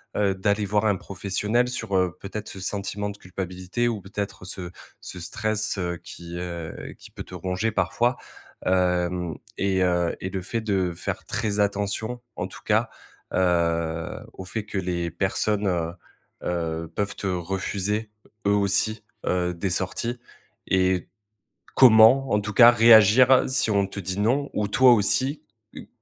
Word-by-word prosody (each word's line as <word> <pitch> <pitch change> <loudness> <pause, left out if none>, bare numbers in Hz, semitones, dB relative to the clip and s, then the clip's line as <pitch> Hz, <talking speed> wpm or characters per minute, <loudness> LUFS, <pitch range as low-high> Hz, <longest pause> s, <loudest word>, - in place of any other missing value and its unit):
heu, 100 -2 +1
d'aller 100 +2 0
voir 105 +2 +1
un 105 -2 +3
professionnel 105 +6 -1
sur, 110 -5 -2
heu, 90 -2 +1
peut-être 105 +2 -6
ce 95 - -9
sentiment 100 +1 -3
de 100 - -8
culpabilité 90 +4 -3
ou 115 -3 -1
peut-être 100 0 -6
ce 90 -1 -6 0.3
ce 90 - -8
stress, 110 +4 -1
heu, 85 -1 -2
qui, 85 0 -9
heu 85 -2 -6
qui - - -13
peut - - -8
te - - -15
ronger 95 +4 -2
parfois. 120 +3 +1 0.5
Hem 90 -2 +1 0.2
et 95 -1 +1
heu, 90 -1 +1
et 95 - -4
le 95 0 -4
fait 115 +4 -3
de 95 -5 0
faire 85 - -5
très 105 -1 -2
attention, 105 +4 -1 0.2
en - - -3
tout - - -13
cas, - - +2 0.5
heu, 85 -2 0
au - - -8
fait 105 +3 -4
que, 105 - -5
les 85 -2 -2
personnes, 100 +3 0
heu 85 -2 -1 0.5
heu, 85 -1 -2
peuvent 105 0 -2
te - - -7
refuser, 95 +4 -2 0.4
eux - - +4
aussi, 105 +2 +1 0.2
heu, 90 -1 0
des, 85 +3 -3
heu, - - 0
sorties 95 +7 -2 0.5
et 95 -1 +1 0.7
comment, 125 +2 +7
en 105 - +4
tout 110 +1 -5
cas, 120 +4 +9
réagir 115 +2 +7
si 130 -3 +1
on 100 -1 +2
te 100 - -7
dit: 95 +1 -4
«Non» 135 +7 +1
ou 105 - 0
toi 125 +4 +6
aussi, 130 +7 +1 0.3
heu, - - -9
100 Hz, 160 wpm, -25 LUFS, 90-110 Hz, 0.7 s, cas